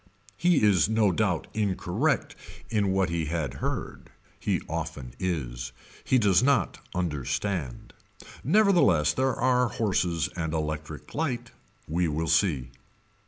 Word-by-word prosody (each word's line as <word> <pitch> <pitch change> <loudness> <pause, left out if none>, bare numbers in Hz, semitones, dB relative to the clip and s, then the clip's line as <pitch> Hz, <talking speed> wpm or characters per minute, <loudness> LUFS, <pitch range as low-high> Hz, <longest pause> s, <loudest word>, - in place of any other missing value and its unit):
He 175 -7 +3
is 100 -3 +4
no 110 -3 +3
doubt 85 - 0
incorrect 100 -3 0 0.4
in 105 -3 +2
what 95 -2 +1
he 85 -2 -1
had 75 -4 -2
heard. - - -4 0.3
He - - 0
often 60 -2 -5
is. 60 -9 -3 0.3
He 130 - +3
does 100 -5 +4
not 130 -8 +2 0.2
understand. 85 -2 -2 0.5
Nevertheless 165 - +4
there 130 0 +1
are 125 0 +2
horses 90 -7 0
and 80 -2 -2
electric 75 -1 -4
light. 125 -6 -2 0.4
We 85 +2 +1
will 80 +1 -2
see. 80 -6 +2
90 Hz, 120 wpm, -27 LUFS, 80-115 Hz, 0.5 s, is